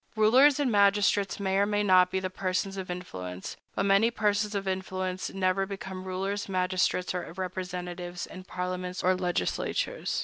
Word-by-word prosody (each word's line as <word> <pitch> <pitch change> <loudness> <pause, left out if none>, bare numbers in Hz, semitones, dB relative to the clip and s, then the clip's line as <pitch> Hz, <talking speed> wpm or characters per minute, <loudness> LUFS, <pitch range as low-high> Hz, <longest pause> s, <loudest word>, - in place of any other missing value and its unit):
Rulers 255 +7 +5
and 275 -4 +1
magistrates 200 -1 +3
may 195 -1 0
or 200 +1 +3
may 205 0 +1
not 185 -2 +5
be 190 - -1
persons 185 +1 -2
of 190 -2 -6
influence; 95 - -6 0.2
but - - 0
many 200 +3 +5
persons 210 -2 0
of 195 -1 -2
influence 185 -1 -2
never 195 0 0
become 190 -1 -6
rulers, 195 +2 -3
magistrates, 185 -1 0
or 180 -2 -4
representatives 180 -1 -5
in 185 - -10
parliaments 180 0 -4
or 185 - +4
legislatures. 185 - -1
185 Hz, 150 wpm, -28 LUFS, 180-200 Hz, 0.2 s, Rulers